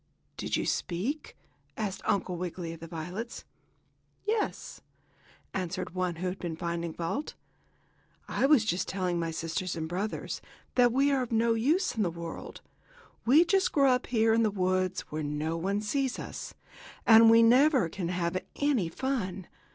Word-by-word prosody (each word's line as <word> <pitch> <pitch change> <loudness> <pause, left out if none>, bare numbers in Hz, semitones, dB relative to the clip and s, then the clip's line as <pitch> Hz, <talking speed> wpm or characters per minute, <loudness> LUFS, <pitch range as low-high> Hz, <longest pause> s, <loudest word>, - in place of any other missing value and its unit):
"Did - - -1
you - - -1
speak?" 225 - -2 0.4
asked 205 -3 -3
Uncle 185 -2 0
Wiggily 175 -1 -4
of 165 - -10
the 165 - -8
violets. 175 +8 -6 0.8
"Yes," 430 0 -2 0.7
answered 185 -1 -3
one 180 -2 -1
who 180 +3 -3
had 180 +1 -4
been 170 -2 -4
finding 170 0 -3
fault. 170 - -3 0.9
"I 270 - +1
was 280 -7 +5 0.2
telling 180 -2 -1
my 165 -1 -1
sisters 165 +2 -3
and 160 -1 -3
brothers 190 +6 -3 0.3
that 245 -1 +5
we 275 +3 +3
are 270 -2 +2
of 245 - -4
no 230 0 +3
use 295 - +1
in 220 - 0
the 185 - +2
world. 170 0 -7 0.7
We 300 +8 +7
just 385 +2 +2
grow 275 -3 +4
up 250 0 +1
here 225 -2 +3
in 230 - +3
the 220 - +3
woods, 185 -1 0
where 155 +1 -2
no 150 +2 -2
one 195 +5 -1
sees 265 +4 -1
us, - - -7 0.5
and 225 0 +8
we 230 0 +7
never 255 - +5
can 175 +1 -4
have 175 0 -1
any 270 - +1
fun. 195 -5 -3
190 Hz, 160 wpm, -29 LUFS, 170-245 Hz, 0.9 s, and